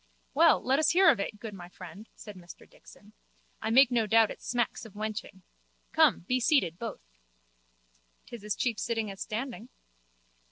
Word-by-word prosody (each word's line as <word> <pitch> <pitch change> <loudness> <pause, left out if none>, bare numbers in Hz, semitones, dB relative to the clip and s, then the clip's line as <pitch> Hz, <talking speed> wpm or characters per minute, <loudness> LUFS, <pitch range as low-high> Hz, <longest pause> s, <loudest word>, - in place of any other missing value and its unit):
Well, - - +5
let 265 +3 +2
us 310 - +3
hear 365 -1 +6
of 245 - -2
it, 205 +1 -4
good 220 -1 -7
my 175 -2 -10
friend, 185 +4 -12
said 210 -2 -11
Mr 175 -1 -13
Dixon. - - -18 0.5
I 220 - -2
make 255 +2 +6
no 230 -3 +1
doubt 225 0 +4
it - - -10
smacks 240 -3 -2
of 220 -3 -13
wenching. 210 -3 -6 0.5
Come, - - +4
be 250 +9 -1
seated, 230 - +1
both. 230 - -6 1.2
'Tis 235 -4 -10
as 210 -1 -2
cheap 230 -4 -1
sitting 225 -3 -2
as 195 - -11
standing. 235 +1 -5
220 Hz, 170 wpm, -29 LUFS, 200-245 Hz, 1.2 s, hear